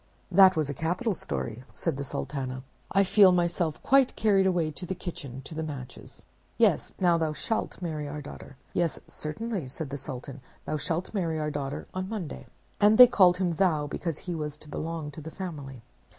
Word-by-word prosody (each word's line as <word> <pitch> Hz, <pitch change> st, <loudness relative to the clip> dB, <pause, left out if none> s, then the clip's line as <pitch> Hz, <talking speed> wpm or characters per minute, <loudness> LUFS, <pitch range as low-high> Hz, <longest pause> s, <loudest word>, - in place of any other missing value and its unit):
"That 190 Hz, +1 st, +7 dB
was 155 Hz, -2 st, +1 dB
a 145 Hz, -, -3 dB
capital 175 Hz, -, -1 dB
story," 75 Hz, -, -4 dB
said 165 Hz, -4 st, -2 dB
the 140 Hz, -, -4 dB
Sultana. 130 Hz, -2 st, -4 dB, 0.3 s
"I 195 Hz, -, +4 dB
feel 195 Hz, 0 st, +6 dB
myself 175 Hz, -3 st, 0 dB
quite 270 Hz, -1 st, +4 dB
carried 195 Hz, -3 st, +3 dB
away 170 Hz, -4 st, +1 dB
to 165 Hz, +5 st, -7 dB
the 190 Hz, -, -2 dB
kitchen, 135 Hz, -7 st, -7 dB
to 160 Hz, -, -9 dB
the 160 Hz, -, -3 dB
Matches. 140 Hz, -6 st, -8 dB, 0.3 s
Yes, -, -, +2 dB
now 175 Hz, -2 st, +4 dB
thou 160 Hz, -1 st, 0 dB
shalt 220 Hz, +10 st, -2 dB
marry 155 Hz, -3 st, -3 dB
our 150 Hz, +1 st, -5 dB
daughter." 140 Hz, -1 st, -10 dB, 0.2 s
"Yes, 170 Hz, -3 st, 0 dB
certainly," 180 Hz, -, -4 dB
said 140 Hz, +2 st, -6 dB
the 140 Hz, -, -3 dB
Sultan, 135 Hz, 0 st, -7 dB, 0.2 s
"thou 155 Hz, -, -1 dB
shalt 165 Hz, +6 st, -2 dB
marry 170 Hz, -6 st, -1 dB
our 150 Hz, 0 st, -1 dB
daughter 140 Hz, -1 st, -4 dB
on 185 Hz, +1 st, -3 dB
Monday." 200 Hz, -9 st, -5 dB, 0.3 s
And 210 Hz, +1 st, +6 dB
they 250 Hz, -, +13 dB
called 185 Hz, -7 st, +5 dB
him 180 Hz, -2 st, +1 dB
thou, 165 Hz, -4 st, +2 dB
because 155 Hz, +2 st, -3 dB
he 180 Hz, -, -5 dB
was 150 Hz, -2 st, -4 dB
to 150 Hz, -, -12 dB
belong 160 Hz, 0 st, -4 dB
to 150 Hz, -, -9 dB
the 160 Hz, -, -7 dB
family. 145 Hz, -, -7 dB
160 Hz, 195 wpm, -28 LUFS, 145-185 Hz, 0.3 s, they